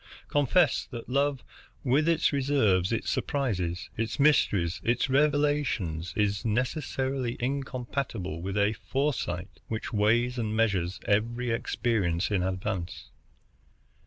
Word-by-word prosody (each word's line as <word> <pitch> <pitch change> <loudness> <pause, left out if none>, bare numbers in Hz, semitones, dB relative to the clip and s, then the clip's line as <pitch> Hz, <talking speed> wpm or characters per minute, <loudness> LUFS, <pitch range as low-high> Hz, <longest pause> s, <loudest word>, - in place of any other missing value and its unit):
Confess 145 +3 +3
that 120 -2 -8
love, 140 0 +1 0.4
with 145 +5 +3
its 165 -2 +2
reserves, 125 -10 +2
its 115 - -1
surprises, 95 -11 -1
its 115 +5 -3
mysteries, 100 - +3
its 125 +3 +1
revelations, 145 - +1
is 100 -1 +1
necessarily 130 +1 -1
incompatible 125 - -3
with 95 +3 -3
a 100 +1 +3
foresight 115 -11 -2
which 110 0 -4
weighs 120 +4 +2
and 110 -1 -1
measures 95 -5 +1
every 120 +4 +1
experience 110 -7 0
in 100 -3 +2
advance." 95 -1 -3
115 Hz, 110 wpm, -28 LUFS, 100-135 Hz, 0.4 s, Confess